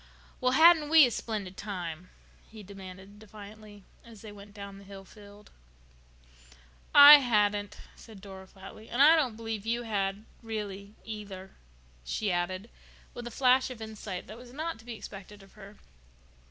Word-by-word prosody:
"Well, 255 Hz, 0 st, +1 dB
hadn't 320 Hz, 0 st, +6 dB
we 315 Hz, -2 st, +8 dB
a 245 Hz, -, -2 dB
splendid 205 Hz, -5 st, -5 dB
time?" 180 Hz, -4 st, -7 dB, 0.4 s
he 215 Hz, -1 st, -12 dB
demanded 195 Hz, +1 st, -12 dB
defiantly, 210 Hz, -1 st, -13 dB, 0.2 s
as 230 Hz, -3 st, -15 dB
they 215 Hz, -, -10 dB
went 205 Hz, 0 st, -14 dB
down 200 Hz, -1 st, -10 dB
the -, -, -15 dB
hill 195 Hz, 0 st, -12 dB
field. 205 Hz, +1 st, -16 dB, 1.4 s
"I 290 Hz, +1 st, +11 dB
hadn't," 205 Hz, -5 st, 0 dB, 0.2 s
said 220 Hz, -4 st, -14 dB
Dora 190 Hz, -1 st, -12 dB
flatly. 195 Hz, +3 st, -14 dB
"And 240 Hz, -, -4 dB
I 305 Hz, +4 st, +7 dB
don't 265 Hz, -8 st, 0 dB
believe 225 Hz, -2 st, -5 dB
you 235 Hz, +2 st, -2 dB
had—really—either," 205 Hz, -1 st, -6 dB, 0.5 s
she 195 Hz, -, -2 dB
added, 185 Hz, +5 st, -3 dB, 0.4 s
with 240 Hz, 0 st, -8 dB
a -, -, -5 dB
flash 255 Hz, +2 st, +2 dB
of 255 Hz, -3 st, -9 dB
insight 215 Hz, -4 st, -7 dB
that 220 Hz, -, -11 dB
was 245 Hz, 0 st, -14 dB
not 315 Hz, -2 st, -5 dB
to 225 Hz, -, -17 dB
be 240 Hz, -1 st, -7 dB
expected 205 Hz, -1 st, -11 dB
of 195 Hz, -, -20 dB
her. 205 Hz, 0 st, -14 dB
210 Hz, 155 wpm, -28 LUFS, 195-230 Hz, 1.4 s, I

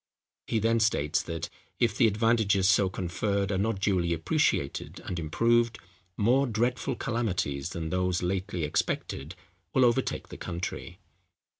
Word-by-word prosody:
He 115 Hz, -, 0 dB
then 115 Hz, +1 st, +2 dB
states 90 Hz, -10 st, +2 dB
that, 80 Hz, 0 st, -4 dB, 0.3 s
if 115 Hz, -4 st, +2 dB
the 120 Hz, -, +5 dB
advantages 110 Hz, -3 st, +2 dB
so 100 Hz, -1 st, +4 dB
conferred 100 Hz, +2 st, -1 dB
are 95 Hz, -, 0 dB
not 105 Hz, 0 st, 0 dB
duly 90 Hz, -4 st, +1 dB
appreciated 80 Hz, -, 0 dB
and 90 Hz, -, -3 dB
improved, 115 Hz, +8 st, +2 dB, 0.4 s
more 130 Hz, +6 st, +3 dB
dreadful 120 Hz, +2 st, 0 dB
calamities 90 Hz, -, -2 dB
than 80 Hz, -2 st, -4 dB
those 90 Hz, -1 st, 0 dB
lately 95 Hz, -1 st, -2 dB
expected 75 Hz, +1 st, -2 dB, 0.4 s
will 130 Hz, -, +6 dB
overtake 125 Hz, +2 st, 0 dB
the -, -, -9 dB
country. 85 Hz, 0 st, -5 dB
100 Hz, 135 wpm, -28 LUFS, 85-115 Hz, 0.4 s, will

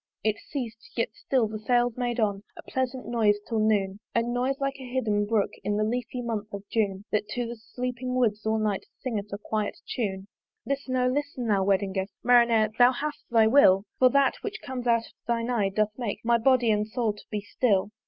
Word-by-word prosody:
It 215 Hz, 0 st, +1 dB
ceas'd: 230 Hz, -6 st, -6 dB
yet 230 Hz, -, +1 dB
still 250 Hz, -3 st, 0 dB
the 215 Hz, 0 st, -6 dB
sails 240 Hz, +1 st, +2 dB
made 245 Hz, -1 st, -2 dB
on 205 Hz, -3 st, +1 dB, 0.2 s
A -, -, -9 dB
pleasant 260 Hz, 0 st, -3 dB
noise 220 Hz, -3 st, +3 dB
till 225 Hz, -2 st, -1 dB
noon, 205 Hz, -2 st, +1 dB, 0.2 s
A 230 Hz, -, +3 dB
noise 250 Hz, +3 st, -1 dB
like 275 Hz, 0 st, -1 dB
of 260 Hz, -, -8 dB
a -, -, -11 dB
hidden 210 Hz, -5 st, +1 dB
brook 215 Hz, -2 st, +1 dB
In 205 Hz, 0 st, 0 dB
the 215 Hz, -, +2 dB
leafy 245 Hz, +2 st, -2 dB
month 215 Hz, -3 st, -3 dB
of 200 Hz, 0 st, -9 dB
June, 200 Hz, -3 st, 0 dB
That 210 Hz, 0 st, 0 dB
to 245 Hz, -1 st, -1 dB
the 235 Hz, +1 st, -5 dB
sleeping 250 Hz, +2 st, -4 dB
woods 215 Hz, -4 st, +1 dB
all 220 Hz, 0 st, +1 dB
night 210 Hz, -3 st, -1 dB
Singeth 210 Hz, -6 st, -3 dB
a 200 Hz, -, -3 dB
quiet 210 Hz, 0 st, -3 dB
tune. 195 Hz, -5 st, -3 dB, 0.4 s
Listen, 275 Hz, 0 st, -2 dB
O 250 Hz, 0 st, +2 dB
listen, 265 Hz, -1 st, -1 dB
thou 200 Hz, -3 st, +2 dB
Wedding 195 Hz, 0 st, +1 dB
guest! 190 Hz, +1 st, -3 dB
"Marinere! 235 Hz, -3 st, +4 dB
thou 245 Hz, +1 st, +8 dB
hast 295 Hz, +4 st, -5 dB
thy 225 Hz, -2 st, +5 dB
will: 220 Hz, -6 st, +6 dB, 0.2 s
"For 255 Hz, -, +7 dB
that, 275 Hz, +1 st, +3 dB
which 430 Hz, +1 st, -5 dB
comes 255 Hz, -2 st, -5 dB
out 230 Hz, -1 st, +3 dB
of -, -, -17 dB
thine 235 Hz, 0 st, 0 dB
eye, 210 Hz, -5 st, +1 dB
doth 215 Hz, +2 st, +1 dB
make 230 Hz, -2 st, -4 dB
"My 235 Hz, 0 st, +4 dB
body 245 Hz, -1 st, +4 dB
and 210 Hz, 0 st, +1 dB
soul 220 Hz, -1 st, -1 dB
to 205 Hz, -, -14 dB
be 210 Hz, -1 st, -3 dB
still." 205 Hz, -2 st, +1 dB
230 Hz, 215 wpm, -27 LUFS, 210-250 Hz, 0.4 s, thou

